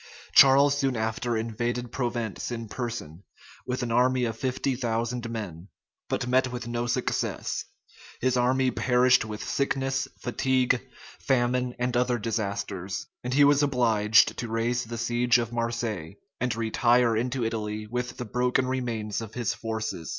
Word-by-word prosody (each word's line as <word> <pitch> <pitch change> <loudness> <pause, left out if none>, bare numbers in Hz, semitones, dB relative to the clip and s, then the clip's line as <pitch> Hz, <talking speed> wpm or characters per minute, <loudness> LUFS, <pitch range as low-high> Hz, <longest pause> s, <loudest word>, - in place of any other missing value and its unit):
Charles 140 +1 +7
soon 135 -3 0
after 110 +1 -1
invaded 120 +2 -2
Provence 120 -5 -3
in 115 -2 -5
person, 105 -10 -5 0.5
with 125 0 -2
an 120 - -2
army 125 +1 +3
of 115 -2 -2
fifty 130 +2 -1
thousand 120 -1 -2
men; 100 -6 -6 0.4
but - - -1
met 130 +1 +2
with 120 -1 -5
no 120 0 -2
success. 115 - -1 0.5
His 130 0 +1
army 130 +1 +2
perished 125 -1 +3
with 105 -1 -6
sickness, 135 -1 0
fatigue, 125 0 +1 0.4
famine, 125 -1 +1
and 125 0 -1
other 125 0 +2
disasters; 100 -4 -3 0.2
and 125 - -3
he 145 - +6
was 145 0 +5
obliged 115 -6 +3
to 120 - -3
raise 115 +2 -1
the 115 +1 -6
siege 120 +1 +2
of 120 -1 -3
Marseilles, 115 -7 -3 0.2
and 125 -3 0
retire 115 +1 +3
into 125 +2 -1
Italy 110 -1 -3
with 125 +3 -4
the 125 - -4
broken 125 +3 +1
remains 115 -5 -2
of 110 -1 -8
his 120 -4 -1
forces. 110 -7 -4
120 Hz, 150 wpm, -27 LUFS, 115-125 Hz, 0.5 s, Charles